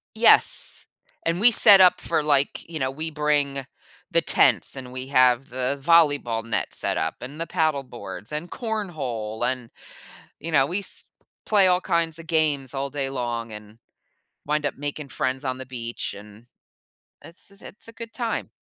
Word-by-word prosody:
Yes, 225 +1 +5 0.4
and 170 +2 0
we 240 +3 +7
set 205 -4 +7
up 185 -1 +6
for, - - -1
like, 145 -2 +1
you 165 -2 -6
know, 130 -2 -1
we 155 +4 -4
bring 145 -3 0 0.4
the - - +2
tents - - +3
and 125 -1 -8
we 130 +1 -6
have 130 -1 +3
the 130 +2 -2
volleyball 145 -8 +3
net 115 - -3
set - - +1
up, - - -2
and 140 +5 -9
the 165 - -2
paddle 155 -6 0
boards, 110 -5 -9
and 155 +3 -5
cornhole, 150 - -4
and, 125 -3 -6 0.7
you 165 - -6
know, 135 -3 +4
we 180 +8 -2
s 200 - -7 0.4
play 200 -3 +4
all 180 0 +3
kinds 165 -2 0
of 165 - -10
games 150 -5 0
all 140 0 -3
day 140 -1 -3
long 120 -3 -4
and 105 0 -11 0.7
wind 150 0 0
up - - -2
making 145 +1 -6
friends 130 +1 -3
on 130 -1 -3
the 130 - -8
beach, 120 -2 -6
and 105 +3 -14 0.8
it's 170 - -12
a - - -10
it's 210 - -10
a - - -10
good 230 0 -10
time. 235 -2 -3
140 Hz, 175 wpm, -24 LUFS, 125-165 Hz, 0.8 s, we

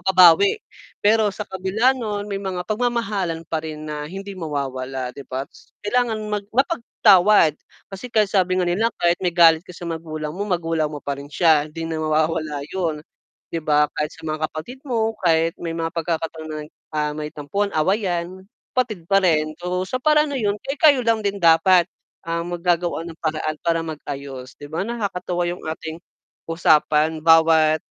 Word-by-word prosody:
mababawi. 185 0 +6 0.5
Pero 215 0 +4
sa 205 +1 -5
kabila 190 +7 +1
no'n, 210 -5 -4
may 195 -1 -3
mga 185 -2 -4
pagmamahalan 215 -7 -1
pa 160 0 -2
rin 155 -1 -7
na 150 -1 -5
hindi 195 +2 -7
mawawala 135 -6 -4
'di 140 - -10
ba? 130 +1 -3 0.4
Kailangan 235 +1 +1 0.2
mag 205 -1 -1
mapagpatawad 210 - +4 0.4
kasi 220 +6 -7
kahit 215 -3 +3
sabi 185 -2 +2
nga 185 - +2
nila 205 +6 +2
kahit 175 0 +3
may 175 - +1
galit 165 -1 +6
ka 180 - -11
sa 175 - -9
magulang 155 -2 -5
mo, 205 - -2
magulang 165 -4 0
mo 145 - -6
pa 140 0 -3
rin 140 +1 -9
siya 160 -3 +4
'di 165 +2 -6
na 160 - -3
mawawala 155 -1 0
'yun, 165 -5 -2 0.5
'di 165 - -3
ba? 150 -1 +3
Kahit 150 0 -2
sa 165 - -15
mga 155 0 -1
kapatid 245 +12 -8
mo 225 -4 -1
kahit 165 +1 +2
may 170 -1 -5
mga 165 0 -2
pagkakataon, 160 -2 -3 0.2
ah, 150 -1 -1
may 150 0 -5
tampuhan, 200 +8 -2
awayan 185 +1 -1 0.3
kapatid 215 -9 -1
pa 195 - +4
rin. 155 -3 +2
So 180 +1 -3
sa - - -1
paraan 300 +3 +3
na 285 - -3
'yun 210 -4 -1
kayo-kayo 285 0 +3
lang 225 -2 +2
din 200 0 -1
dapat 170 +1 +5 0.3
ang 170 +1 -3
maggagawa 175 -1 0
ng 165 - -10
paraan 155 -1 -2
para 165 -1 +2
mag-ayos 140 -4 -7
'di 145 - -9
ba, 160 +6 -2
nakakatuwa 185 -6 -2
yung 175 +1 -5
ating, 160 0 -5 0.5
usapan 155 -1 +3
bawat 160 -1 +5
170 Hz, 170 wpm, -22 LUFS, 155-200 Hz, 0.5 s, mababawi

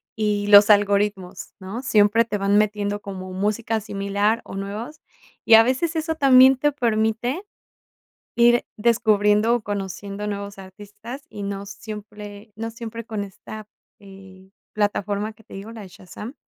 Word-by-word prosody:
y 210 -2 -1
los 205 +1 +8
algoritmos, 205 -2 +1
¿no? 195 +6 -6
Siempre 220 -2 +3
te 210 -2 -3
van 200 +1 +2
metiendo 205 -1 -1
como 185 -2 -8
música 215 +3 -1
similar 200 +2 -1
o - - -9
nuevos, 215 +10 -6 0.4
y 225 - +8
a 225 - +8
veces 260 +8 -1
eso 320 0 -1
también 265 -3 +6
te 295 +3 +1
permite 235 - -1 1.0
ir 240 0 +4
descubriendo 215 -1 +2
o 240 - 0
conociendo 200 0 -5
nuevos 200 -1 -5
artistas, 205 +7 -11
y 205 - -8
no 200 0 -5
siempre 210 0 -10
no 225 +1 -5
siempre 230 0 -8
con 210 -3 -4
esta, 210 +2 -11 0.3
eh, 190 -1 -15 0.2
plataforma 205 0 -2
que 220 - -22
te 210 - -13
digo, 210 +4 -9
la 220 - -9
de 190 - -11
Shazam, 205 +6 -10
210 Hz, 150 wpm, -22 LUFS, 200-230 Hz, 1.0 s, los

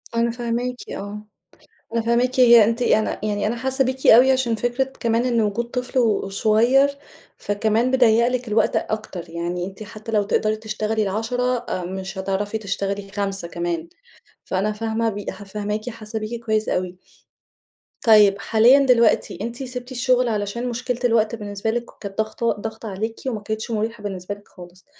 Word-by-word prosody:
أنا 235 0 +2
فاهماكِ 240 +1 -2
آه، 205 +1 -6 0.7
أنا 230 - +2
فاهماكِ 245 +3 +1
هي 235 -3 +8
أنتِ 230 +3 0
أنا 220 -2 +1
يعني 205 -1 -1
أنا 235 +2 -1
حاسة 265 +2 +1
بيكِ 260 +1 -2
أوي 255 +4 +8
عشان 250 -3 +1
فكرة 245 +4 0 0.2
كمان 230 +1 +1
إن 235 -2 +2
وجود 215 +3 0
طفل 250 +2 -3
وصغير، 225 +4 +3 0.5
فكمان 220 +4 0
بيضّيق 235 -2 +4
لِك 250 -2 -2
الوقت 215 0 +2
أكتر، 185 -6 -4
يعني 175 +1 -3
أنتِ 195 +2 -9
حتى 215 +1 -9
لو 210 -1 +3
تقدري 215 +2 0
تشتغلي 215 0 -2
ال10، 235 +5 -1 0.2
مش 190 +1 -6
هتعرفي 200 +3 -2
تشتغلي 200 -1 -3
5 195 -4 -2
كمان، 340 - -3 0.6
فأنا 195 +3 0
فاهمة 225 +1 -1
بي 205 -1 -6
ح 205 - -10
فاهماكِ، 210 +3 -4
حاسة 220 -1 -6
بيكِ 230 +2 -6
كويس 220 -1 0
أوي. 180 0 -2 1.1
طيب 210 -3 +6
حاليًا 235 +5 +5
دلوقتي 235 -3 +3
أنتِ 235 +4 -4
سيبتِ 250 0 -7
الشغل 250 -1 +2
علشان 215 +3 -2
مشكلة 240 +1 -3
الوقت 225 -1 +2
بالنسبة 205 0 -4
لِك 240 0 -2
ك - - -16
كانت 200 -1 -7
ضاغطة 220 +2 0
ضاغطة 220 +1 -7
عليكِ 220 +4 -3
وما 220 -5 -2
كانِتش 220 +2 -4
مُريحة 220 0 -2
بالنسبة 195 0 -4
لِك 205 - -20
خالص. 180 0 -14
220 Hz, 165 wpm, -22 LUFS, 205-240 Hz, 1.1 s, هي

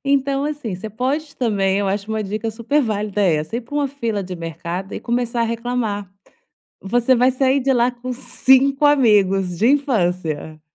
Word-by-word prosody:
Então, 275 0 +1
assim, 290 -9 -4
você 215 +5 -6
pode 275 +7 -3
também 200 -5 +1
Eu 200 -1 0
acho, 200 +2 -3
uma 220 0 -1
dica 215 +3 -3
super 235 +7 0
válida 210 -2 -2
essa: 160 +3 +1
ir - - -2
para 245 +5 -11
uma 285 -2 +1
fila 230 -7 -3
de 180 -1 -6
mercado 170 +3 -5
e - - -5
começar 240 0 -1
a - - +2
reclamar. 230 -4 -3 0.7
Você 240 +6 +2
vai 250 +1 +4
sair 265 +1 +2
de 270 +1 +1
lá 245 0 +3
com 250 +1 -6
5 265 +2 +3
amigos 195 -10 +3
de 225 - +3
infância. 180 - 0
230 Hz, 180 wpm, -20 LUFS, 195-260 Hz, 0.7 s, vai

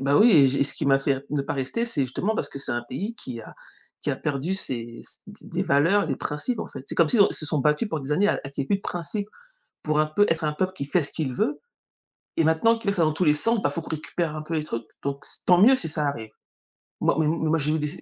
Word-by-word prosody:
bah, 140 +2 0
oui 230 +2 +5
et 140 -5 +5
j'ai 140 +1 +1
ce 140 - +6
qui - - -3
m'a 135 0 +3
fait 135 -1 -2
ne 145 -2 -2
pas - - -5
rester, 135 - -3
c'est 230 -11 +5
justement 180 - -3
parce - - +1
que 140 - -7
c'est 135 - +3
un 120 0 -4
pays 220 +4 -6
qui 120 - -7
a - - -15 0.5
qui - - -2
a - - -4
perdu 150 +6 -3
ses 120 -9 +2
s - - +4
des 205 0 -10
des 180 +3 -3
valeurs, 165 +5 +1
les 135 - -4
principes, 215 - 0
en - - -6
fait. 135 - -10
C'est - - 0
comme 165 -3 +2
s'ils 225 - +5
se - - +7
sont - - +1
ils - - +8
se 155 - +6
sont 155 -1 +3
battus 150 - 0
pendant 160 - -4
des 135 +2 -1
années 200 +7 +1
à - - -1
qu'il 140 - -4
y - - -6
ait - - -17
plus 200 - 0
de - - -16
principe 180 +5 -2 0.5
pour 155 -1 -2
un 155 - +1
peu 180 +7 +1
être 165 -1 -2
un 150 - -1
peuple 185 +4 -3
qui 140 - -5
fait 165 +5 0
ce 145 - +4
qu'il 145 -6 -3
veut 235 - -2 0.8
et - - +1
maintenant 160 +9 +1
qu'il 225 -2 -7
le - - 0
fait 175 - +1
dans 155 -1 +1
tous 160 +4 -1
les 150 -2 +3
sens, 225 +7 +4
bah, - - 0
il - - -4
faut 165 - -1
qu'on - - -10
récupère 160 +1 -4
un 155 - -7
peu 165 +2 -6
les 155 -1 -2
trucs, 115 -5 -6 0.2
donc 140 0 -5 0.2
tant 180 -1 +4
mieux 260 +5 +5
si 170 - +5
ça 150 -1 +3
arrive. 115 -6 -7 0.7
Moi, - - +1
mais 155 - 0
mais 160 0 -2
moi, 165 - +1
j'ai 150 +2 +1
vu 150 -1 -3
155 Hz, 305 wpm, -23 LUFS, 140-190 Hz, 0.8 s, ils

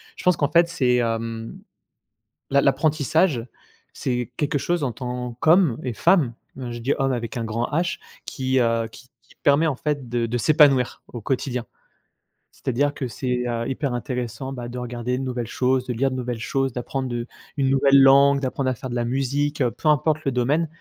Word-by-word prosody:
je - - -10
pense 180 -3 +3
qu'en 145 - +1
fait 170 +2 +4
c'est 130 -8 +2
hem, 115 -1 -3 0.9
l'a 140 - +4
l'apprentissage, 145 -1 +2 0.5
c'est 125 -1 -3
quelque 145 -1 0
chose 175 +3 -1
en 135 - 0
tant 125 0 -5
qu'homme 160 -4 +4
et 125 - -2
femme, 155 - +3 0.2
heu, 125 -2 -5
je 120 - -6
dis 135 +5 +1
homme 135 -1 +1
avec 120 -1 -4
un 115 - -2
grand 115 +2 -1
H, 170 +3 0 0.3
qui, 130 0 -1
heu, 115 -2 +1
qui 120 +3 -15 0.2
qui - - -24
permet 145 +3 +4
en 140 - -1
fait 145 -3 -3
de 120 0 0
de 120 +2 -2
s'épanouir 140 -1 +4
au 120 - -6
quotidien. 125 0 -2 0.9
C'est - - -6
à - - +2
dire 145 +4 +1
que 135 - -3
c'est, 125 +1 -2
heu, 115 -1 -2
hyper 135 0 -2
intéressant 125 +1 -4
bah, 125 -3 -6
de 125 +1 -6
regarder 125 0 -3
de - - -3
nouvelles 125 -2 -3
choses, 130 +2 0
de 125 - -3
lire 135 +4 +1
de 130 - -4
nouvelles 125 -2 -3
choses, 135 +2 -1
d'apprendre, 125 +1 -3
heu, 120 0 -3 0.3
une 135 -2 +2
nouvelle 135 0 +5
langue, 140 +1 +6
d'apprendre 130 0 -1
à - - -1
faire 130 +2 -7
de 120 - -4
la 120 -1 0
musique, 140 +4 -1
heu, 125 - +3
peu 155 - -1
importe 155 +1 +2
le 135 - +1
domaine. 140 +7 +1
130 Hz, 205 wpm, -23 LUFS, 120-140 Hz, 0.9 s, langue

